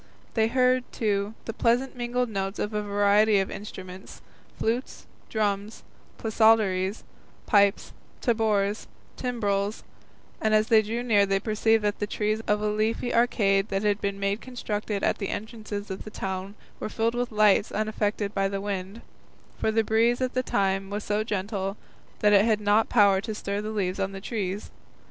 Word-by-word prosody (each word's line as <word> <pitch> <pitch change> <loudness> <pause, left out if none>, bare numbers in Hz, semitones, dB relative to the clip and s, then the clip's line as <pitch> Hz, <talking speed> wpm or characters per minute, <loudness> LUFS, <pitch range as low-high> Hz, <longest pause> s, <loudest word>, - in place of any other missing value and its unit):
They 220 -1 +3
heard, 255 +1 +3
too, 205 -1 -1
the 225 - -4
pleasant 245 +4 +1
mingled 245 0 -1
notes 195 -2 -3
of 210 - -3
a 210 - 0
variety 205 +1 +3
of 195 -1 0
instruments, 190 -2 -9 0.3
flutes, 235 +4 -2 0.2
drums, 205 -1 -2 0.3
psalteries, 215 -3 +2 0.4
pipes, 200 -2 +3 0.3
tabors, 215 -3 +1
and - - -31
timbrels, 205 -4 -1 0.6
and 215 0 +3
as 215 +1 +2
they 220 -2 +6
drew 225 +3 -3
near 205 -4 +3
they 195 0 +1
perceived 220 +1 +2
that 205 0 0
the 205 - -1
trees 215 +1 -1
of 210 0 +1
a - - +1
leafy 215 +3 0
arcade 210 -4 +2
that 195 +1 -1
had 205 0 +1
been 200 0 -2 0.2
constructed 215 -4 -4
at - - +1
the 200 - -3
entrance 220 +1 -6
of 205 -2 -4
the - - -8
town 190 0 -5 0.2
were - - -4
filled 225 +1 0
with 245 0 -2
lights 210 -1 +4
unaffected 210 -1 -1
by 195 -1 +1
the 195 0 -3
wind, 200 +2 -4 0.6
for - - +1
the 225 0 +2
breeze 230 +3 +2
at 255 -1 -1
the 255 - +1
time 195 -4 0
was 205 +1 -4
so 210 +1 0
gentle 200 -1 -3 0.4
that 210 0 +5
it 200 0 +6
had 220 -1 +2
not 210 +1 +2
power 200 -4 +5
to 220 0 -5
stir 200 0 -3
the 215 - -4
leaves 195 -3 -2
on 195 0 -1
the 195 - -6
trees. 200 -2 -4
210 Hz, 170 wpm, -26 LUFS, 200-225 Hz, 0.6 s, they